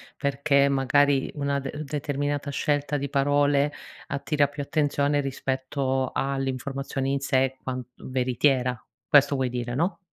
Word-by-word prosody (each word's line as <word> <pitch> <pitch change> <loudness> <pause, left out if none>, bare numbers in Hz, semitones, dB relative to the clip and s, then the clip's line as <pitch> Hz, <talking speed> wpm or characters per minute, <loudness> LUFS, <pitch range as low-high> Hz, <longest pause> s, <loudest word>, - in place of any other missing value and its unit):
perché 140 0 +2
magari 140 +1 +2
una 140 -1 0
de 135 0 -5
determinata 145 0 -2
scelta 145 0 0
di 140 0 -3
parole 145 +1 +2 0.3
attira 145 +1 +1
più 145 0 -7
attenzione 145 0 +1
rispetto 130 -1 -1
all'informazione 135 0 -2
in 140 0 +1
sé 130 -1 +1
quan 130 -1 -4
veritiera. 125 -1 0 0.3
Questo 140 0 +5
vuoi 130 -2 0
dire 120 0 -3
no? 170 +7 0
140 Hz, 125 wpm, -26 LUFS, 130-145 Hz, 0.3 s, Questo